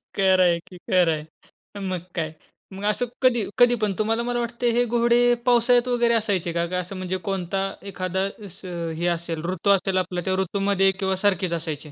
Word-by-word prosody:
खरं 190 -1 +4
आहे 170 -1 +3
की, 185 +1 -14
खरं 180 -1 +2
आहे. 155 +6 -11
मग 185 -2 -2 0.2
काय? 160 -2 -2 0.4
मग 195 - -8
असं 210 +4 +1 0.2
कधी 240 -3 +3
कधी 245 -1 +5
पण 205 -2 +1
तुम्हाला 225 +2 +1
मला 240 0 -1
वाटतं 235 +1 -2
हे 245 - +4
घोडे 240 +1 +3
पावसाळ्यात 245 0 +4
वगैरे 240 -1 +2
असायचे 200 -7 0
का? 170 0 0
का 180 +1 -2
असं 180 +2 -6
म्हणजे 185 0 -3
कोणता 195 0 -1 0.3
एखादा 190 +1 -1 0.2
असं 180 -3 -6
हे 175 +2 -1
असेल 170 -2 -2
ऋतू 185 +2 -1
असेल 195 -1 +2
आपला, 180 -1 -1
त्या 190 +2 -1
ऋतूमध्ये 195 0 +2
किंवा 190 0 -1
सारखेच 190 -2 0
असायचे? 155 -2 -5
190 Hz, 185 wpm, -24 LUFS, 175-225 Hz, 0.4 s, कधी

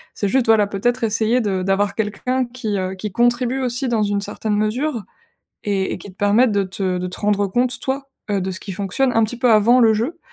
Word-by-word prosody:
c'est 205 - -1
juste, 255 +4 +2
voilà, 220 -2 +5
peut-être 240 +5 -1
essayer 225 +2 +1
de 195 -4 -1
d'avoir 195 +1 +1
quelqu'un 250 +4 -1
qui, 235 -4 -4
heu, 185 0 -3
qui 205 +1 -5
contribue 240 +3 +1
aussi 250 +1 -1
dans 230 -2 +1
une 205 -1 0
certaine 210 +1 -2
mesure. 230 +4 -1 0.6
Et 195 -2 -1
et - - -4
qui 200 - -11
te 185 - -21
permettent 210 +4 +3
de 200 -1 +1
te 185 -1 -2
de 180 - -3
te 180 - -5
rendre 205 -1 +1
compte 245 +5 +1
toi, 275 +1 -3 0.2
heu, 200 -1 +1
de 190 +1 -3
ce 185 - -5
qui 200 - -8
fonctionne 205 +8 0
un 225 -1 +3
petit 235 +3 -4
peu 250 -1 +3
avant 225 +3 +5
le 225 -2 +5
jeu. 250 +11 -2
215 Hz, 230 wpm, -20 LUFS, 200-245 Hz, 0.6 s, voilà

